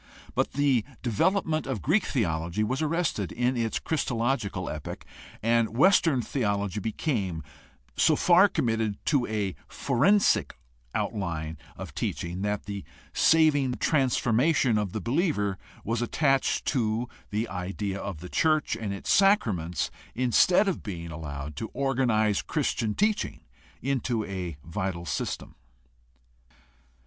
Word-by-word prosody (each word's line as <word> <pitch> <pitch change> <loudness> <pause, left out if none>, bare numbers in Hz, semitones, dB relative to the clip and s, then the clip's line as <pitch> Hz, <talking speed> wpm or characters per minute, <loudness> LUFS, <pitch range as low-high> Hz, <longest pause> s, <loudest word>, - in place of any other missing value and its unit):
But - - 0
the 135 -5 +2 0.2
development 155 - +1
of 130 -6 -3
Greek 180 +8 +2
theology 85 - -1
was 130 +7 -1
arrested 155 - 0
in 125 +2 0
its 115 -2 0
christological 125 -7 -1
epoch, - - -6 0.4
and 115 0 +2
Western 160 -5 +4
theology 100 -5 -1
became 105 - -2 0.5
so - - +4
far 180 +3 +6
committed 110 - 0
to 140 -5 +2
a 105 -3 -1
forensic 145 - +2 0.4
outline 80 -7 -2 0.2
of - - -7
teaching 85 +2 -3
that 105 0 -1
the 100 -1 -5 0.3
saving 145 -5 +4
transformation 130 -2 +2
of 105 -3 -2
the 110 - -4
believer 115 - 0 0.2
was 115 +2 -1
attached 135 +2 +1
to 115 -2 0 0.2
the 110 +3 -1
idea 100 +1 -4
of 95 -7 -5
the 90 - -7
church 155 - +2
and 110 -3 -4
its 100 - 0
sacraments 105 - +2 0.2
instead 130 - +4
of 190 - -1
being 85 -5 -6
allowed 75 -2 -6
to 110 - -4
organize 120 -6 +2
Christian 120 -8 -1
teaching 210 0 0 0.4
into 125 -4 0
a 90 -5 -5
vital 85 0 -3
system. 75 - -3
115 Hz, 120 wpm, -27 LUFS, 100-140 Hz, 0.5 s, far